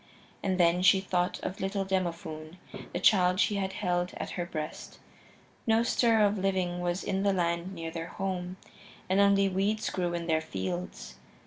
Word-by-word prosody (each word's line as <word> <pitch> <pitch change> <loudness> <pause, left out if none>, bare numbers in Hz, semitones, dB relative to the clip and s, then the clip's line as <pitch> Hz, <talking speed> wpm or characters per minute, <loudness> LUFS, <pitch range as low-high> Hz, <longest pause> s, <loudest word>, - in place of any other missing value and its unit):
And 190 -1 -1
then 175 +1 +4
she 190 +1 +6
thought 180 -2 -1
of 185 - -4
little 195 0 -1
Demophoon, 170 -3 -3 0.3
the 175 - -2
child 185 -1 +4
she 205 -1 +2
had 190 -1 -2
held 180 -2 -1
at - - -5
her 175 -1 -3
breast. 155 -2 -6 0.7
No 225 +1 +4
stir 230 -2 +3
of 205 0 +1
living 185 -2 0
was 175 +1 -1
in 195 -1 -1
the 200 0 +2
land 170 0 -1
near 165 -1 -5
their 165 0 -5
home, 185 -1 -4 0.5
and 190 +2 +2
only 200 0 +5
weeds 200 +3 0
grew 175 -2 -1
in 170 0 -3
their 160 -1 +1
fields. 90 - -5
185 Hz, 175 wpm, -29 LUFS, 170-195 Hz, 0.7 s, she